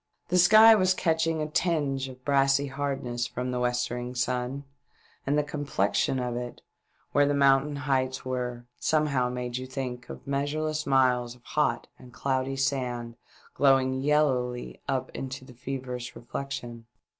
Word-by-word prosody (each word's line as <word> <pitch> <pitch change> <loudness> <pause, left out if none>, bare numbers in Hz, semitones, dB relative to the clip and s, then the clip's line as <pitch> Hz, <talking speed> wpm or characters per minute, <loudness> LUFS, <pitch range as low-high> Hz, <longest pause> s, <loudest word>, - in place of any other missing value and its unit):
The 180 - +3
sky 215 +5 +9
was 185 -3 +3
catching 160 -2 +1
a - - -2
tinge 145 -5 0
of 130 0 -13
brassy 140 0 +3
hardness 135 -3 -3
from 125 +1 -4
the 125 - -2
westering 125 0 -1
sun, 125 +2 -1 0.6
and 145 +2 +2
the 150 - +3
complexion 140 -5 0
of 125 -1 -2
it, 120 0 -6 0.5
where 145 0 +4
the 145 - +1
mountain 140 +1 +4
heights 130 -2 -1
were, 125 -2 -3
somehow 145 -5 +1
made 125 0 -4
you 130 0 -5
think 125 -2 -5
of - - -9
measure 140 +2 -1
less 155 0 -2
miles 125 -3 +2
of 125 - -23
hot 135 -5 0
and 125 -1 -14
cloudy 135 0 -1
sand 125 -4 -1 0.4
glowing 130 -1 +3
yellowly 125 - 0
up - - -1
Into 130 0 -6
that 125 -2 -16
feverish 125 -2 -5
reflection. 120 -2 -6
130 Hz, 150 wpm, -27 LUFS, 125-145 Hz, 0.6 s, sky